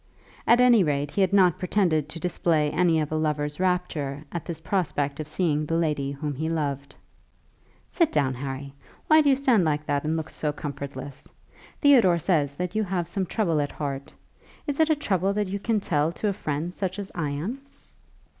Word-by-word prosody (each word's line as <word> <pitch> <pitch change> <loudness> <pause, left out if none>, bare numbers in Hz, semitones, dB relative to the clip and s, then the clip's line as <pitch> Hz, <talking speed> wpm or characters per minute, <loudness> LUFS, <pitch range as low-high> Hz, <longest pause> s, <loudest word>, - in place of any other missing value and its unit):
At 240 - +6
any 245 -5 +6
rate 145 -2 -1
he 200 - 0
had 190 -1 +3
not 185 -4 +4
pretended 175 -6 +1
to 165 - -7
display 160 -3 +1
any 170 -3 +3
of 150 -1 -2
a - - -1
lover's 150 -1 -1
rapture 170 -6 -1
at 170 -3 -5
this 165 -2 -5
prospect 155 -5 -1
of 155 - -4
seeing 155 -2 0
the 165 - 0
lady 150 -4 0
whom 145 +1 -4
he 155 +4 -3
loved. 140 -4 -3 1.0
"Sit 335 -3 +2
down, 140 -3 +1
Harry. 135 +1 -6 0.3
Why 310 0 +6
do 290 - +3
you 270 - +5
stand 255 -7 +3
like 150 -2 0
that 145 -1 0
and 155 +1 0
look 160 - -5
so 150 - -2
comfortless? 140 -2 -7 0.5
Theodore 240 - +6
says 150 -5 +1
that 180 +3 -3
you 215 0 +1
have 180 -3 -2
some 190 +1 -2
trouble 165 -9 +1
at 145 - -3
heart. 140 -2 -4 0.5
Is 290 -1 -3
it 320 0 +4
a 315 - +4
trouble 195 - 0
that 210 0 0
you 200 +1 -3
can 220 +1 0
tell 155 -4 0
to 210 - -1
a - - 0
friend 155 0 -3
such 190 0 -3
as 200 -1 -6
I 160 -4 -2
am?" 180 - -4
160 Hz, 200 wpm, -25 LUFS, 145-190 Hz, 1.0 s, At